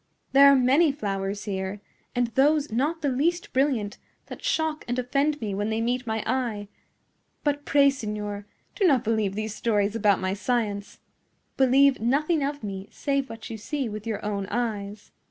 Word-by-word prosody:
There 280 Hz, +1 st, +8 dB
are -, -, +6 dB
many 275 Hz, +5 st, +4 dB
flowers 200 Hz, -5 st, -3 dB
here, 190 Hz, 0 st, -3 dB, 0.4 s
and 245 Hz, 0 st, +2 dB
those 285 Hz, +4 st, +2 dB
not 300 Hz, +8 st, -1 dB
the -, -, +2 dB
least 335 Hz, +7 st, 0 dB
brilliant, 255 Hz, -7 st, 0 dB, 0.3 s
that -, -, -9 dB
shock 315 Hz, -10 st, 0 dB
and 245 Hz, +1 st, -2 dB
offend 280 Hz, +4 st, 0 dB
me 210 Hz, -3 st, -3 dB
when 205 Hz, +2 st, -1 dB
they 220 Hz, 0 st, -1 dB
meet 245 Hz, +2 st, -1 dB
my 220 Hz, -1 st, -1 dB
eye. 225 Hz, -5 st, -2 dB, 0.7 s
But 290 Hz, -1 st, -1 dB
pray, 280 Hz, -1 st, +5 dB
signor, 210 Hz, -4 st, -5 dB, 0.3 s
do 395 Hz, -, +2 dB
not 270 Hz, -7 st, +3 dB
believe 215 Hz, -3 st, 0 dB
these 215 Hz, 0 st, -3 dB
stories 210 Hz, -2 st, 0 dB
about 205 Hz, -3 st, +3 dB
my 185 Hz, 0 st, -1 dB
science. 205 Hz, -2 st, -2 dB, 0.6 s
Believe 270 Hz, +1 st, +4 dB
nothing 290 Hz, +6 st, +1 dB
of 285 Hz, -1 st, -3 dB
me 195 Hz, -1 st, -6 dB
save 275 Hz, -2 st, -1 dB
what 225 Hz, 0 st, -8 dB
you 225 Hz, -, -5 dB
see 275 Hz, +4 st, -3 dB
with 215 Hz, 0 st, -6 dB
your 215 Hz, -2 st, -3 dB
own 200 Hz, -2 st, -2 dB
eyes." 210 Hz, -3 st, -3 dB
235 Hz, 175 wpm, -26 LUFS, 205-280 Hz, 0.7 s, There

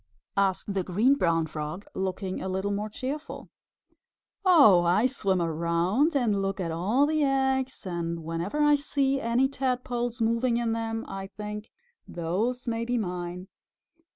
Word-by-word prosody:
asked 195 Hz, 0 st, +1 dB
the 190 Hz, -1 st, 0 dB
Green 210 Hz, +10 st, +3 dB
Brown 165 Hz, -, +2 dB
Frog, 155 Hz, +4 st, -6 dB
looking 190 Hz, 0 st, -3 dB
a 190 Hz, -, -3 dB
little 190 Hz, +2 st, -1 dB
more 205 Hz, +1 st, -2 dB
cheerful. 270 Hz, +8 st, -6 dB, 0.9 s
"Oh, 285 Hz, -, +7 dB
I 180 Hz, +7 st, +3 dB
swim 200 Hz, -8 st, 0 dB
around 170 Hz, -, +1 dB
and 220 Hz, -7 st, +2 dB
look 195 Hz, 0 st, -2 dB
at 170 Hz, -3 st, -2 dB
all 205 Hz, -, +2 dB
the 310 Hz, +1 st, +1 dB
eggs, 265 Hz, -3 st, 0 dB
and 170 Hz, -2 st, -3 dB
whenever 170 Hz, -, -1 dB
I 295 Hz, 0 st, +5 dB
see 275 Hz, -1 st, +1 dB
any 235 Hz, +3 st, +2 dB
Tadpoles 250 Hz, -3 st, -2 dB
moving 230 Hz, +1 st, +1 dB
in 235 Hz, -1 st, 0 dB
them 225 Hz, 0 st, -3 dB
I 195 Hz, 0 st, -6 dB
think, 210 Hz, +2 st, -7 dB, 0.4 s
'Those 210 Hz, +10 st, -2 dB
may 230 Hz, 0 st, -1 dB
be 245 Hz, +1 st, -1 dB
mine!' 180 Hz, -2 st, -4 dB
210 Hz, 150 wpm, -27 LUFS, 180-255 Hz, 0.9 s, Oh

